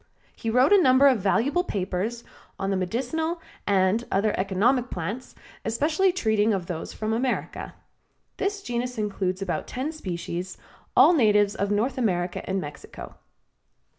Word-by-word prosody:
He 225 Hz, -, -4 dB
wrote 250 Hz, -, +4 dB
a 400 Hz, -, +7 dB
number 260 Hz, -1 st, +6 dB
of 260 Hz, -5 st, +4 dB
valuable 250 Hz, -, +2 dB
papers 200 Hz, -, -3 dB, 0.3 s
on 195 Hz, 0 st, -2 dB
the -, -, +1 dB
medicinal 265 Hz, -, -2 dB, 0.3 s
and 195 Hz, +3 st, +2 dB
other 205 Hz, +2 st, +2 dB
economic 225 Hz, +7 st, +1 dB
plants, 205 Hz, +9 st, -5 dB, 0.3 s
especially 310 Hz, +10 st, +2 dB
treating 220 Hz, -, +2 dB
of 185 Hz, -3 st, -4 dB
those 170 Hz, -2 st, -5 dB
from 220 Hz, 0 st, -3 dB
America. 250 Hz, +2 st, -2 dB, 0.6 s
This 395 Hz, 0 st, -2 dB
genus 245 Hz, -2 st, -3 dB
includes 195 Hz, -3 st, -2 dB
about 180 Hz, -, -3 dB
ten 265 Hz, +5 st, -3 dB
species, 185 Hz, -, -5 dB, 0.4 s
all -, -, +8 dB
natives 210 Hz, -8 st, +4 dB
of 200 Hz, -2 st, -2 dB
North 235 Hz, +6 st, 0 dB
America 180 Hz, -6 st, 0 dB
and 190 Hz, +1 st, 0 dB
Mexico. 145 Hz, -4 st, -9 dB
220 Hz, 140 wpm, -25 LUFS, 190-260 Hz, 0.6 s, all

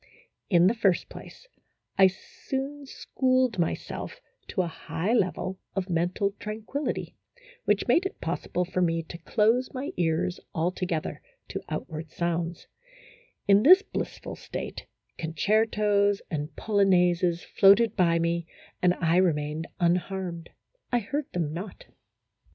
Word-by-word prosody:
In 175 Hz, -2 st, +5 dB
the 195 Hz, -, +5 dB
first 200 Hz, -6 st, +1 dB
place, -, -, -12 dB, 0.5 s
I 190 Hz, -1 st, +7 dB
soon 270 Hz, +8 st, -5 dB
schooled 255 Hz, -5 st, 0 dB
myself 170 Hz, -, -3 dB, 0.3 s
to 185 Hz, -, 0 dB
a -, -, -2 dB
high 165 Hz, +5 st, -3 dB
level 185 Hz, -3 st, 0 dB, 0.2 s
of 190 Hz, -1 st, -2 dB
mental 175 Hz, +4 st, +1 dB
tranquillity, 220 Hz, +7 st, -4 dB, 0.5 s
which -, -, +2 dB
made 380 Hz, +3 st, +4 dB
it 385 Hz, -, -14 dB
pos -, -, -3 dB
sible 180 Hz, -, 0 dB
for 185 Hz, +1 st, -2 dB
me 165 Hz, -1 st, +1 dB
to 170 Hz, +1 st, -9 dB
close 225 Hz, +9 st, +1 dB
my 265 Hz, +2 st, -4 dB
ears 170 Hz, +1 st, 0 dB, 0.2 s
altogether 175 Hz, -1 st, -2 dB, 0.3 s
to -, -, -4 dB
outward 160 Hz, 0 st, -5 dB
sounds; 170 Hz, 0 st, -2 dB, 0.8 s
in 200 Hz, 0 st, +6 dB
this 370 Hz, -, +8 dB
blissful -, -, -5 dB
state, -, -, -7 dB, 0.3 s
concertos 205 Hz, +3 st, +2 dB
and 150 Hz, -1 st, -3 dB
polo 205 Hz, -2 st, +1 dB
naises 175 Hz, -2 st, +3 dB
floated 205 Hz, +3 st, +5 dB
by 170 Hz, -3 st, +3 dB
me, 170 Hz, 0 st, 0 dB, 0.3 s
and 180 Hz, 0 st, +4 dB
I 165 Hz, 0 st, +2 dB
remained 155 Hz, -3 st, +1 dB
unharmed; 175 Hz, -1 st, -1 dB, 0.4 s
I 245 Hz, -, +3 dB
heard 280 Hz, +6 st, -3 dB
them 160 Hz, -4 st, -1 dB
not. 185 Hz, +3 st, -7 dB
185 Hz, 130 wpm, -27 LUFS, 170-215 Hz, 0.8 s, this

